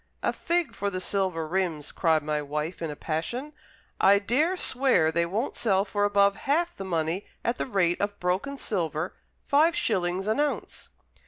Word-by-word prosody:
"A - - +1
fig 345 -1 0
for 200 - -2
the 185 -2 -4
silver 185 -4 -1
rims!" 170 -4 -1
cried 160 -2 +2
my 150 0 -1
wife, 150 +4 -4
in 165 - -2
a 150 - -5
passion. 235 - -3 0.5
"I 200 +1 +6
dare 295 - +1
swear 250 - +3
they 170 +1 +1
won't 215 +9 -2
sell 195 -3 +1
for 205 0 0
above 200 -1 +4
half 335 +5 0
the - - -6
money 170 +1 -1 0.2
at 235 - 0
the - - -1
rate 180 -7 +1
of 205 0 -2
broken 190 +11 -1
silver, 170 - -2 0.3
five 315 +4 +4
shillings 185 -3 0
an 220 +5 0
ounce." 295 -1 -2
195 Hz, 175 wpm, -27 LUFS, 170-240 Hz, 0.5 s, I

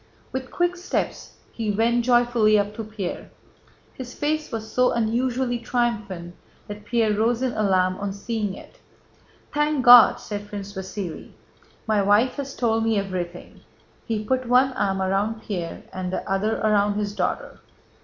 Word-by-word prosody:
With 260 0 -4
quick 350 0 0
steps 355 - -3 0.2
he 225 -2 -3
went 230 +3 +1
joyfully 240 -3 +4
up 205 0 0
to 225 - -5
Pierre. 210 -4 -6 0.6
His 250 -1 -8
face 305 +1 -2
was 220 -2 -5
so 250 0 +3
unusually 240 +2 0
triumphant 215 -8 -2 0.3
that 205 0 -8
Pierre 225 -1 +1
rose 230 +4 +1
in 255 - +1
alarm 185 -3 +1
on 200 0 -3
seeing 205 0 -3
it. - - -14 0.7
"Thank 295 -2 +1
God!" 245 -1 +9
said 205 -1 -6
Prince 200 -1 -7
Vasíli. 190 -2 -6 0.5
"My 215 -2 +2
wife 210 +7 +3
has 275 -1 -5
told 225 -2 +1
me 225 -1 +1
everything!" 180 -3 -5 0.5
(He 220 -2 -1
put 255 +2 0
one 255 +2 +4
arm 190 -4 0
around 205 +4 -1
Pierre 175 -5 -5
and 185 -1 -4
the - - -4
other 200 +3 0
around 205 -1 +2
his 205 -1 -2
daughter.) - - -3
220 Hz, 155 wpm, -24 LUFS, 200-245 Hz, 0.7 s, God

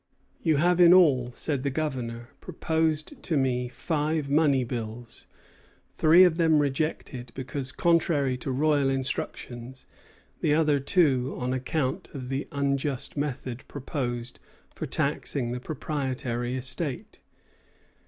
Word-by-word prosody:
"You 160 -3 +2
have 175 +3 +3
in 175 +1 +9
all," 135 -9 +4
said 145 -4 -2
the 140 - 0
Governor, 125 -5 -3
"proposed 160 - -1
to 160 - -1
me 125 -2 +1
five 150 +1 -2
money 145 -3 +4
bills, 115 -1 -6 0.7
three 165 +4 +7
of 175 -3 +4
them 160 -3 +4
rejected 140 -4 -2
because 130 0 -4
contrary 160 -6 +2
to 130 - -5
royal 145 +1 +2
instructions; 130 -1 -4 0.5
the 150 - +2
other 150 -3 +3
two 135 -4 +2
on 125 0 -2
account 130 +1 -2
of 130 -2 -6
the 135 +2 -2
unjust 140 -1 -1
method 135 -4 -4
proposed 125 -4 -4 0.3
for - - -5
taxing 120 -4 -1
the 125 - -3
proprietary 130 -4 -3
estate. 130 +2 -3
140 Hz, 125 wpm, -27 LUFS, 125-155 Hz, 0.7 s, in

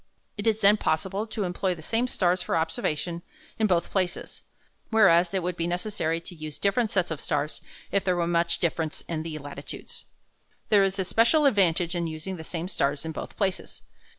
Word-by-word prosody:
It 205 +1 -3
is 220 -1 +2
then 205 +2 +6
possible 190 +5 -1
to 215 -1 -3
employ 180 0 -1
the 160 - -12
same 230 +8 0
stars 180 -5 +1
for - - -1
observation 165 +1 -2 0.4
in 220 - +4
both 175 -3 +1
places, 185 -2 -2 0.5
whereas 180 -6 +5
it 190 -2 -1
would 180 0 -2
be 170 -1 -1
necessary 175 -2 -1
to 170 - -8
use 155 -3 -7
different 210 +3 +1
sets 185 -6 0
of 155 - -3
stars 150 0 -2 0.3
if 200 - +2
there 180 -1 +1
were 175 -1 +1
much 170 0 +2
difference 160 -2 -1
in 160 -2 -4
the 160 -1 -5
latitudes. 145 -1 -8 0.6
There 205 -2 +6
is 195 0 0
a 190 - +1
special 235 - +3
advantage 180 -8 +3
in 170 -1 -1
using 160 +4 -5
the 160 - -7
same 170 +1 -4
stars 145 -4 -1
in 160 - -3
both - - -7
places. 190 -2 -2
175 Hz, 195 wpm, -27 LUFS, 160-200 Hz, 0.6 s, then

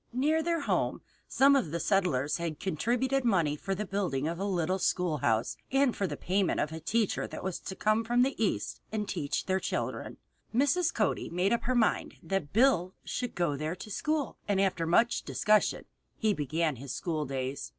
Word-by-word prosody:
Near 300 +6 +2
their 335 0 0
home - - 0 0.3
some 275 +1 +5
of 260 - +1
the 170 +2 -2
settlers 160 -6 +1
had 170 -3 -4
contributed 245 - 0
money 175 -11 +2
for 195 +6 -3
the 210 +3 -3
building 180 -8 -1
of 170 +1 -3
a 195 - -1
little 185 -1 0
schoolhouse 150 -12 +1
and 270 -2 +3
for 195 - -1
the - - -5
payment 190 0 0
of 150 - 0
a 160 - -5
teacher 215 +6 0
who - - -6
was 185 -1 -3
to 190 - -7
come 215 +3 +2
from 240 +2 +3
the 270 +2 +1
East 205 - -1
and 210 -1 -2
teach 150 -6 -2
their 190 0 +1
children. - - -3 0.4
Mrs. 290 +7 +3
Cody 215 -3 0
made 180 +5 +1
up 235 - -1
her 255 +1 +1
mind 230 -3 +1
that 195 -7 -2
Bill 215 -6 +3
should 245 -2 -4
go 170 -5 +1
there 155 +4 -3
to 210 +3 -9
school, 305 +5 -1
and 200 -2 +1
after 185 -4 +1
much 230 +8 +3
discussion 215 0 +2 0.3
he 215 -2 +2
began 155 -1 -1
his 135 +2 -7
school 155 +3 -2
days. 135 - -3
190 Hz, 190 wpm, -30 LUFS, 160-235 Hz, 0.4 s, some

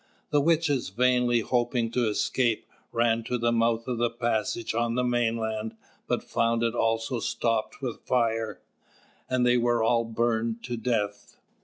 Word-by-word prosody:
The 145 -1 +4
witches, 150 - +1
vainly 125 +2 +2
hoping 120 -1 0
to 120 -1 +1
escape, 115 +2 0 0.3
ran 115 -1 +2
to 125 - -1
the 120 0 +1
mouth 115 0 +1
of 125 -2 -2
the 120 0 +2
passage 115 -1 -1
on 115 0 0
the 125 - +1
mainland, 115 -2 -1 0.3
but - - 0
found 115 0 0
it 115 -1 +1
also 115 +1 0
stopped 115 +3 -1
with 125 -3 -4
fire; 115 -3 0 0.7
and 130 -1 +2
they 125 0 +4
were 120 -1 +2
all 115 +1 +3
burned 115 0 -1
to 120 -1 -3
death. 110 -3 -2
115 Hz, 155 wpm, -27 LUFS, 115-120 Hz, 0.7 s, The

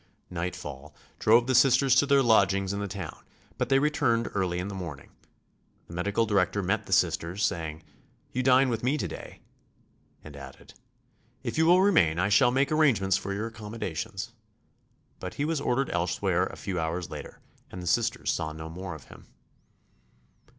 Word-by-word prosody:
Nightfall 80 -4 -6 0.2
drove 115 +2 +5
the 130 - 0
Sisters 130 +1 +5
to 135 +3 +4
their 140 -1 +4
lodgings 100 -4 +3
in 100 - -3
the 100 - -3
town, 95 -5 -7 0.4
but 125 -1 -1
they 135 - +5
returned 135 -5 +1
early 95 -3 -1
in 90 +2 -3
the 100 - -6
morning. 85 -8 -7 0.7
The - - -12
medical 100 +6 0
director 100 -1 +1
met 100 +4 -1
the - - -10
Sisters, 90 +2 +1
saying: 80 -1 -3 0.5
"You 130 - -1
dine 130 +1 +4
with 115 -2 -2
me 135 +5 +1
to - - -2
day," - - -10 0.8
and 75 -2 -11
added: 70 -1 -12 0.7
"If - - -3
you 160 - +4
will 180 +2 +6
remain 85 - +4
I 95 +3 +1
shall 115 +5 +5
make 135 +3 +1
arrangements 120 -12 +3
for 100 - -3
your 100 +3 -2
accommodations." 110 -1 -5 0.9
But 90 - -6
he 145 - -1
was 160 -2 -1
ordered 135 +1 0
elsewhere 90 +1 0
a - - -9
few 95 -3 -4
hours 85 +2 -3
later - - -8 0.3
and 90 - -8
the 90 - -7
Sisters 110 +6 +1
saw 80 -1 -3
no 80 +1 -8
more 90 0 -6
of 80 - -12
him. - - -14
100 Hz, 175 wpm, -27 LUFS, 90-125 Hz, 0.9 s, will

